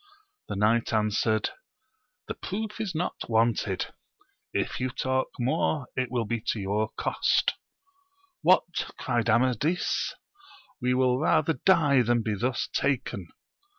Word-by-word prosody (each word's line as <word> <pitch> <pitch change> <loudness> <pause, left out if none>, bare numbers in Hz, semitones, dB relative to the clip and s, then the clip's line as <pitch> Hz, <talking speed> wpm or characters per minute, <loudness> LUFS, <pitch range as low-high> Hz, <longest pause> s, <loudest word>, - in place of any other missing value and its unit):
The - - -4
knight 110 +3 +2
answered, 110 0 +1 0.8
The - - -3
proof 215 +2 -5
is 195 -6 -3
not 175 +3 -1 0.2
wanted: 110 -4 +1 0.6
if - - -2
you 130 +1 0
talk 130 0 0
more 140 +2 0
it 130 -2 -1
will 120 -2 -1
be 115 +1 -2
to 110 - 0
your 100 +2 0
cost - - +2 0.9
What! - - +3
cried 120 -1 0
Amadis, 130 +9 +1 0.7
we 125 +1 +2
will 130 0 +3
rather 155 +1 +3
die 145 -3 +4
than 120 -1 +2
be 110 - -1
thus 120 +4 -1
taken 120 -9 -1
125 Hz, 125 wpm, -27 LUFS, 110-140 Hz, 0.9 s, die